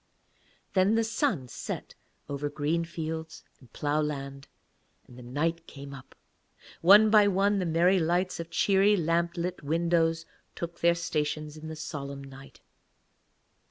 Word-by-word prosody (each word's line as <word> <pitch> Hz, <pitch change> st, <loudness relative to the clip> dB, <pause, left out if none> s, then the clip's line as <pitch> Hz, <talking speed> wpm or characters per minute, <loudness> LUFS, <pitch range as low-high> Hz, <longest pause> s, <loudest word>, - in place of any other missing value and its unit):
Then 195 Hz, +3 st, +3 dB
the 225 Hz, -, +2 dB
sun 225 Hz, -, -1 dB
set -, -, -6 dB, 0.3 s
over 145 Hz, +1 st, -3 dB
green 155 Hz, +3 st, -1 dB
fields 160 Hz, -1 st, -6 dB, 0.2 s
and 125 Hz, -4 st, -20 dB
ploughland 145 Hz, -2 st, -2 dB, 0.6 s
and 125 Hz, -, -15 dB
the 125 Hz, -, -11 dB
night 160 Hz, +7 st, -2 dB
came 140 Hz, 0 st, -10 dB
up. 135 Hz, -1 st, -12 dB, 0.7 s
One 210 Hz, +5 st, +7 dB
by 210 Hz, -2 st, +6 dB
one 200 Hz, +1 st, +2 dB
the 180 Hz, -, -1 dB
merry 175 Hz, +4 st, +3 dB
lights 175 Hz, +3 st, 0 dB
of 170 Hz, 0 st, -6 dB
cheery 200 Hz, +3 st, +3 dB
lamp 170 Hz, +1 st, 0 dB
lit 180 Hz, +1 st, -3 dB
windows 165 Hz, +1 st, +1 dB, 0.3 s
took 170 Hz, 0 st, -6 dB
their 170 Hz, 0 st, +4 dB
stations 150 Hz, -2 st, -2 dB
in 155 Hz, 0 st, -9 dB
the 160 Hz, -, -6 dB
solemn 140 Hz, -2 st, -6 dB
night. 135 Hz, 0 st, -13 dB
165 Hz, 140 wpm, -28 LUFS, 145-180 Hz, 0.7 s, One